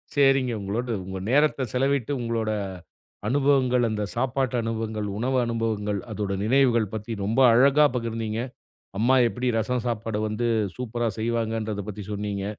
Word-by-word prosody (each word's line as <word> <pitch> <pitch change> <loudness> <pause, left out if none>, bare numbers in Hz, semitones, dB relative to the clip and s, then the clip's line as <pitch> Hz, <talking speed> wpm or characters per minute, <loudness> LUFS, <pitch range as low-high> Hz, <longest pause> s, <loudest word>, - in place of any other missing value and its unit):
சரிங்க 135 -3 +4
உங்களோடு 115 +5 -2
உங்க 95 0 -5
நேரத்த 145 0 +3
செலவிட்டு 135 0 +1
உங்களோட 115 -2 -1 0.8
அனுபவங்கள், 130 -2 +3
அந்த 105 -1 -2
சாப்பாட்டு 130 +1 0
அனுபவங்கள், 110 -2 -3
உணவு 130 +4 0
அனுபவங்கள் 110 -3 -1
அதோட 100 -2 -2
நினைவுகள் 120 -3 +3
பத்தி 110 +2 -6
ரொம்ப 110 +6 0
அழகா 140 +5 +6
பகிர்ந்தீங்க. 115 -1 -3 0.6
அம்மா 120 +4 +4
எப்படி 125 +2 -4
ரசம் 125 +2 -1
சாப்பாடு 115 -2 -2
வந்து 110 +3 -2 0.3
சூப்பர்ரா 120 -1 -2
செய்வாங்கங்கறதைப் 110 -2 -2
பத்தி 105 0 -7
சொன்னீங்க. 100 -1 -3
115 Hz, 130 wpm, -25 LUFS, 110-125 Hz, 0.8 s, அழகா